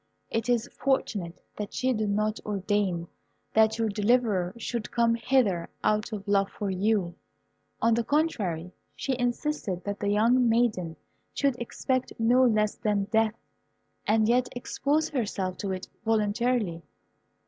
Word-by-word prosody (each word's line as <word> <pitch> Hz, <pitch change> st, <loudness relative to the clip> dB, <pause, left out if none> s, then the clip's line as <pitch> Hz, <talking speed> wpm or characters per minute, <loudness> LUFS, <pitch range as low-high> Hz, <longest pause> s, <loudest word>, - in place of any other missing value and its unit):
It 225 Hz, +2 st, -1 dB
is 235 Hz, -2 st, +2 dB
fortunate 210 Hz, -10 st, -1 dB
that 210 Hz, -1 st, -5 dB
she 260 Hz, 0 st, +1 dB
did 215 Hz, -2 st, -1 dB
not 215 Hz, +2 st, 0 dB
ordain 200 Hz, -4 st, -1 dB, 0.5 s
that 220 Hz, 0 st, +4 dB
your 225 Hz, -1 st, +1 dB
deliverer 210 Hz, -3 st, +2 dB
should 235 Hz, -1 st, -4 dB
come 235 Hz, -1 st, +2 dB
hither 230 Hz, -7 st, +1 dB
out 215 Hz, +2 st, +1 dB
of 205 Hz, -1 st, -6 dB
love 200 Hz, -1 st, +2 dB
for 200 Hz, -2 st, -3 dB
you. 190 Hz, -2 st, +1 dB, 0.7 s
On 230 Hz, 0 st, +5 dB
the 235 Hz, +1 st, +1 dB
contrary, 200 Hz, -, 0 dB, 0.2 s
she 270 Hz, -, -1 dB
insisted 245 Hz, -, -1 dB
that 200 Hz, 0 st, -4 dB
the 205 Hz, -, -1 dB
young 235 Hz, +4 st, +4 dB
maiden 215 Hz, -8 st, +1 dB, 0.4 s
should 280 Hz, -3 st, +2 dB
expect 255 Hz, +2 st, -2 dB
no 240 Hz, +3 st, +4 dB
less 215 Hz, -4 st, +3 dB
than 210 Hz, -3 st, 0 dB
death, 220 Hz, -1 st, +2 dB, 0.7 s
and 215 Hz, 0 st, +3 dB
yet 245 Hz, +2 st, +3 dB
expose 285 Hz, +5 st, 0 dB
herself 200 Hz, -8 st, -2 dB
to 200 Hz, -, -3 dB
it 185 Hz, -1 st, -4 dB, 0.2 s
voluntarily. 220 Hz, -3 st, +1 dB
220 Hz, 140 wpm, -27 LUFS, 200-240 Hz, 0.7 s, On